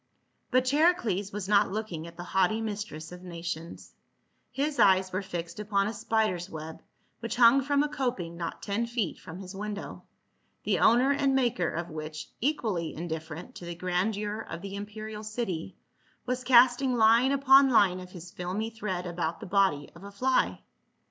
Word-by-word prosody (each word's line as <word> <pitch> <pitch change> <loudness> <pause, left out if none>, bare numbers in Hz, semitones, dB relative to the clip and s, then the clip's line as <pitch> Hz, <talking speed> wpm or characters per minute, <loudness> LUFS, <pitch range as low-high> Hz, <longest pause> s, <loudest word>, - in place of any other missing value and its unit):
But 255 -1 +3
Charicles 255 - +2
was 200 -2 -5
not 205 0 +4
looking 190 -6 -4
at 170 0 -13
the 175 - -6
haughty 190 +4 +1
mis 210 -2 -3
tress 155 -3 -9
of 180 0 -10
nations; 170 -2 -7 0.6
his 285 +1 -2
eyes 190 -1 +4
were 185 - 0
fixed 175 -2 -6
upon 200 -1 +1
a 215 - -2
spider's 210 -5 0
web 160 -1 -8 0.4
which 230 0 -4
hung 245 +2 +6
from 285 +1 +2
a - - 0
coping 245 - -3
not 170 -1 -5
ten 220 +3 -1
feet 230 -8 -2
from 165 -1 -9
his 190 0 -8
window, 205 +1 -6 0.6
the - - +1
owner 245 +4 +5
and 275 -1 +2
maker 240 -10 +1
of 170 +1 -4
which, 155 0 -7
equally 220 - -1
indifferent 160 0 -6
to 175 - -10
the 170 0 -5
grandeur 200 +4 -1
of 165 +2 -7
the 195 -1 -6
imperial 210 +1 -7
city, 210 -6 -4 0.5
was 255 0 -2
casting 250 +1 +5
line 230 +3 +5
upon 275 0 +6
line 195 -7 +4
of 180 0 -9
his 175 -1 -10
filmy 190 +6 -3
thread 200 -5 -4
about 170 -1 -3
the 220 - -8
body 190 -7 +1
of 170 - -14
a 200 - -9
fly. 255 +6 +1
200 Hz, 175 wpm, -28 LUFS, 175-235 Hz, 0.6 s, hung